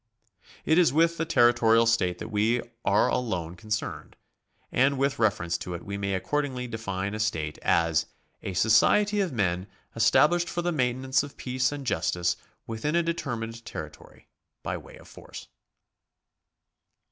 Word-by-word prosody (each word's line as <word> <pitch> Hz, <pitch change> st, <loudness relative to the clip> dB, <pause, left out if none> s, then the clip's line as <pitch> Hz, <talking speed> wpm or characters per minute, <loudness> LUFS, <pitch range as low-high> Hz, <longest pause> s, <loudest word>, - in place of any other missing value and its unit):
It 160 Hz, +3 st, +4 dB
is 170 Hz, -7 st, +4 dB
with 165 Hz, +3 st, +2 dB
the 165 Hz, -, -1 dB
territorial 120 Hz, -4 st, +4 dB
state 105 Hz, -6 st, +1 dB
that -, -, -7 dB
we 110 Hz, +3 st, +2 dB, 0.2 s
are 100 Hz, +1 st, +3 dB
alone 90 Hz, -9 st, -2 dB
concerned, 105 Hz, +3 st, -5 dB, 0.6 s
and 135 Hz, +2 st, +2 dB
with 140 Hz, -1 st, 0 dB
reference 90 Hz, -6 st, +1 dB
to 90 Hz, -, -5 dB
it 85 Hz, -, -9 dB
we 100 Hz, -, -5 dB
may 100 Hz, -1 st, -2 dB
accordingly 130 Hz, +4 st, -2 dB
de 115 Hz, -2 st, -6 dB
fine 100 Hz, -2 st, -3 dB
a 110 Hz, -, -4 dB
state 80 Hz, -8 st, -2 dB
as 85 Hz, -1 st, +2 dB, 0.3 s
a 95 Hz, -, -5 dB
society 205 Hz, -, +4 dB
of 185 Hz, -4 st, -1 dB
men 95 Hz, -5 st, -1 dB, 0.3 s
established 150 Hz, +10 st, +3 dB
for 175 Hz, -, -3 dB
the 175 Hz, -, 0 dB
maintenance 130 Hz, -2 st, +1 dB
of 145 Hz, 0 st, -9 dB
'peace 130 Hz, 0 st, -1 dB
and 145 Hz, -2 st, -6 dB
justice 90 Hz, -4 st, 0 dB, 0.3 s
ivithin 115 Hz, +8 st, -2 dB
a 170 Hz, -, +3 dB
determined 115 Hz, -9 st, -4 dB
territory -, -, -10 dB, 0.4 s
by -, -, -2 dB
uay -, -, -11 dB
of -, -, -16 dB
force. -, -, -11 dB
115 Hz, 155 wpm, -27 LUFS, 100-140 Hz, 0.6 s, It